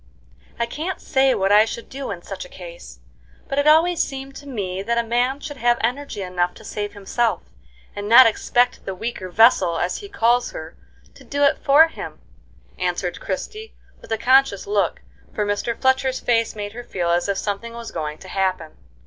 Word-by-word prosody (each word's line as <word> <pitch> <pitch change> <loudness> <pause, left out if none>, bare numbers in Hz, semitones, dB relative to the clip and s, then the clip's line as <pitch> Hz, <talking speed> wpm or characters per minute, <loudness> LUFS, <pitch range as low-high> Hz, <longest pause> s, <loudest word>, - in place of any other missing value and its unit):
"I 235 - 0
can't 320 +10 -4
say 265 0 +2
what 195 +1 +1
I 210 +1 +7
should 230 +1 -6
do 270 0 -6
in - - -6
such - - -6
a - - -12
case; - - -11 0.5
but 275 - -1
it 285 - +1
always 325 +2 +5
seemed 270 0 -5
to 285 - -11
me 195 -7 -3
that 235 +4 -1
a 235 - +2
man 245 +4 0
should 290 -1 -7
have 240 -1 +2
energy 245 -3 -2
enough 180 -1 -1
to - - -14
save 205 -1 -4
himself, 215 +3 -1 0.5
and 205 0 -5
not 245 +3 +10
expect 240 +2 +1
the 195 - -4
'weaker 190 -2 -5
vessel,' 180 -4 +4
as 175 +2 -1
he 405 - -9
calls 240 - +1
her, 160 +1 -8 0.4
to - - -16
do 285 0 -1
it 280 - +3
for 300 +3 +6
him," - - -8 0.6
answered - - -2
Christie, 440 -3 -5 0.3
with - - -14
a 225 - +1
conscious 260 -3 +3
look, 200 -3 0 0.3
for 210 - 0
Mr. 205 +3 -2
Fletcher's 260 0 +2
face 230 -2 +1
made 205 0 -5
her 245 +1 -7
feel 175 -6 -2
as 175 +3 +1
if 200 - 0
something 205 +4 -3
was 235 -1 -7
going 155 -2 -4
to 190 - -13
happen. 185 -4 -2
235 Hz, 195 wpm, -22 LUFS, 200-270 Hz, 0.6 s, not